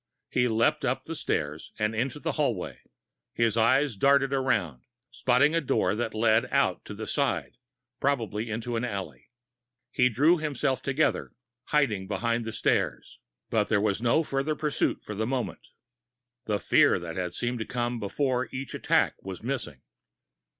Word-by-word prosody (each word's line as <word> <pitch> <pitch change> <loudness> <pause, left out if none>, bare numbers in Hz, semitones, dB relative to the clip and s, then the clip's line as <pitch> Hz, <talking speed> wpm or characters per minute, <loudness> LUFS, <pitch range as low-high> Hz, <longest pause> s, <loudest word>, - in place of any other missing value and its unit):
He 125 -1 +2
leaped 115 0 +2
up - - 0
the - - -6
steps 75 +1 -3
and 105 0 0
into 125 +5 -2
the 165 +2 -2
hallway. 135 - -2 0.6
His 115 -2 +2
eyes 130 +3 +3
darted 135 +5 +3
around, 110 - 0 0.3
spotting 130 +5 +3
a 165 - +2
door 100 - +1
that 115 +1 -3
led 110 +2 +3
out - - +1
to - - -7
the - - -5
side, - - -1 0.4
probably 115 -5 -1
into 115 +2 -3
an 115 - -1
alley. 95 - -5 0.6
He 125 0 +3
drew 150 +9 +4
himself 140 -4 -1
together, 140 +3 0 0.3
hiding 110 -11 +1
behind 115 +2 -1
the 110 - -3
stairs. - - -1 0.3
But - - +2
there 105 - +3
was 105 0 0
no 120 +7 +3
further 140 +1 -1
pursuit 150 -1 -1
for 105 - -6
the 110 +2 -2
moment. 130 -1 -3 0.8
The 105 -1 0
fear - - +4
that 90 +1 -4
seemed 120 0 -2
to 110 - -3
come 120 -1 -2
before 125 +4 -1
each 130 +1 -5
attack - - +1
was 95 +1 -7
missing. 120 - -3
120 Hz, 155 wpm, -27 LUFS, 105-135 Hz, 0.8 s, drew